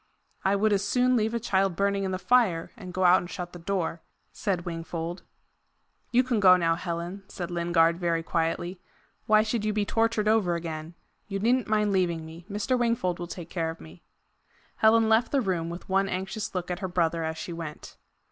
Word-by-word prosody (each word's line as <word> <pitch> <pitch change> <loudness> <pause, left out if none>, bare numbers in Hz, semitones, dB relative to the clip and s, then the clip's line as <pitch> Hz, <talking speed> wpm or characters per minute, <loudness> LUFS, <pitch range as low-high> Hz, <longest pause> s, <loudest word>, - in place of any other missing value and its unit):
"I 195 +1 +3
would 210 +1 +2
as 200 0 +1
soon 250 +5 +2
leave 220 0 +1
a - - 0
child 195 -4 +1
burning 200 +1 +1
in - - -1
the 185 - -1
fire, 190 -4 +2
and 185 -4 -9
go 185 +1 -1
out 180 0 +7
and 175 - -7
shut 180 -2 -6
the 175 - -9
door," 170 -2 -2 0.3
said 185 -4 -2
Wingfold. 165 +1 -5 0.9
"You 250 +1 +4
can 245 -3 0
go 185 -2 +7
now, 165 -2 +2
Helen," 170 +2 -4
said 175 -1 -6
Lingard 170 -1 +2
very 170 -2 0
quietly. 175 +2 -2 0.5
"Why 215 -1 +5
should 220 0 -1
you 215 0 0
be 210 -1 0
tortured 225 0 +1
over 210 -6 +3
again? 165 -1 -5 0.3
You 195 -2 -3
needn't 240 +5 +2
mind 210 -1 +2
leaving 175 -4 0
me. 165 +2 -11
Mr. 210 +5 0
Wingfold 230 -8 0
will 175 - -4
take 170 -1 -8
care 165 -3 -1
of 165 - -7
me." 80 +2 -13 0.8
Helen 220 0 +5
left 220 +2 +3
the 280 - +3
room, 180 -8 -1
with 170 +1 -8
one 195 +1 +1
anxious 195 +3 -4
look 180 0 -2
at 175 - -3
her 190 - -3
brother 170 -2 0
as 160 0 -3
she 170 - -5
went. 165 -2 -8
185 Hz, 205 wpm, -27 LUFS, 170-215 Hz, 0.9 s, out